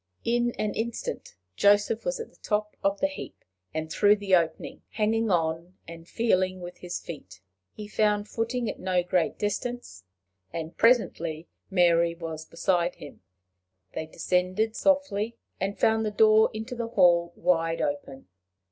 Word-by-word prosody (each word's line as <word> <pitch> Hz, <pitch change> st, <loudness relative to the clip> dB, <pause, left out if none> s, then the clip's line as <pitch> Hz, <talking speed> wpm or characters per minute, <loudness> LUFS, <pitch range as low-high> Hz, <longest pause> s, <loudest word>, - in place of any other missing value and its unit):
In 240 Hz, +1 st, +2 dB
an 210 Hz, -1 st, -1 dB
instant 230 Hz, +1 st, -4 dB, 0.2 s
Joseph 205 Hz, -, +3 dB
was -, -, -1 dB
at 460 Hz, -, -7 dB
the -, -, -26 dB
top 210 Hz, 0 st, -1 dB
of 195 Hz, 0 st, +1 dB
the -, -, +2 dB
heap, 285 Hz, -, -9 dB, 0.3 s
and 160 Hz, 0 st, -4 dB
through 205 Hz, +3 st, +5 dB
the 200 Hz, -2 st, -3 dB
opening, 165 Hz, -2 st, -1 dB
hanging 225 Hz, +1 st, 0 dB
on, 170 Hz, 0 st, -1 dB
and 165 Hz, 0 st, -10 dB
feeling 185 Hz, -5 st, +1 dB
with 175 Hz, 0 st, -8 dB
his 180 Hz, 0 st, -5 dB
feet. 95 Hz, -, -10 dB, 0.3 s
He 210 Hz, -, -8 dB
found 210 Hz, 0 st, +1 dB
footing 235 Hz, +2 st, -2 dB
at -, -, -4 dB
no 185 Hz, -1 st, +1 dB
great 180 Hz, -1 st, 0 dB
distance, 205 Hz, -, -4 dB, 0.5 s
and 165 Hz, 0 st, -5 dB
presently 170 Hz, -9 st, +2 dB, 0.2 s
Mary 170 Hz, -3 st, +3 dB
was 160 Hz, -2 st, -6 dB
beside 175 Hz, +1 st, 0 dB
him. -, -, -12 dB, 0.7 s
They 160 Hz, -, -4 dB
descended 185 Hz, +7 st, 0 dB
softly, 235 Hz, -6 st, +1 dB, 0.2 s
and 195 Hz, +2 st, -3 dB
found 220 Hz, 0 st, +3 dB
the 215 Hz, -, 0 dB
door 215 Hz, +1 st, +5 dB
into 220 Hz, +4 st, -6 dB
the 235 Hz, -1 st, -3 dB
hall 175 Hz, -5 st, +4 dB
wide 165 Hz, -1 st, +1 dB
open. 140 Hz, -3 st, -4 dB
195 Hz, 150 wpm, -27 LUFS, 170-220 Hz, 0.7 s, through